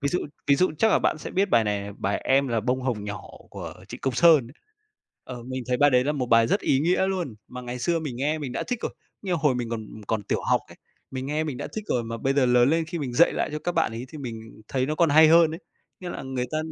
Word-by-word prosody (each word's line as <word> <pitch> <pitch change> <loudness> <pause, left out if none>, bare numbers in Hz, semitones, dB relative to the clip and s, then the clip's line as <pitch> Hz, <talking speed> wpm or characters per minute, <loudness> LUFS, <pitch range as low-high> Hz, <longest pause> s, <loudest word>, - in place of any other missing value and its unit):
Ví 140 - 0
dụ 180 - -1 0.2
ví 140 - +5
dụ 185 - +3
chắc 220 - +4
là - - +4
bạn - - 0
sẽ - - -7
biết 195 +2 +1
bài 115 -2 +4
này 105 -1 -1
này, 100 0 -7
bài 100 - 0
"Em 135 +1 +3
là 115 -2 0
bông 125 +3 -1
hồng 120 -6 -2
nhỏ" 100 -1 -5 0.3
của - - -7
Trịnh - - -8
Công 135 -3 -1
Sơn. 155 -5 +5 0.8
Ờ, 125 -2 -8
mình 130 +1 -5
thấy 125 - +1
bài 145 +3 +5
đấy 125 -1 +3
là 150 - +1
một 135 -4 -2
bài 115 -1 +5
rất - - +1
ý 135 - +2
nghĩa 180 +4 +2
luôn 180 - -2
mà 125 - -7
ngày 125 0 -6
xưa 165 +7 0
mình 145 -7 -5
nghe 150 +4 0
mình 135 -4 -5
đã - - -2
thích 245 -2 -2
rồi. - - -3 0.3
Như 190 - -2
hồi 155 -5 +2
mình 120 -2 -3
còn 110 -2 -4 0.2
còn 110 -2 -1
tiểu - - -2
học - - +4
ấy, - - -14 0.3
mình 130 0 -5
nghe 150 +2 -1
mình 145 -5 -4
đã - - -5
thích 215 - -3
rồi 120 -2 0
mà 115 0 -5
bây 135 +4 0
giờ 135 -2 +3
lớn 125 +1 +4
lên 165 +1 +2
khi 165 +2 -5
mình 135 -5 -4
dạy 165 +8 +5
lại - - -1
cho 150 - -2
các 175 +3 -3
bạn 165 -9 +1
ấy 115 +3 -6
thì 155 - -10
mình 115 -5 -8
thấy 130 -1 0
nó 155 - -1
còn 165 0 +3
hay 155 +1 +7
hơn 165 -1 +6
ấy, 165 +4 -7 0.4
nghĩa 180 - -5
là - - -6
người 130 -2 -3
ta 155 - -1
135 Hz, 295 wpm, -25 LUFS, 120-160 Hz, 0.8 s, hay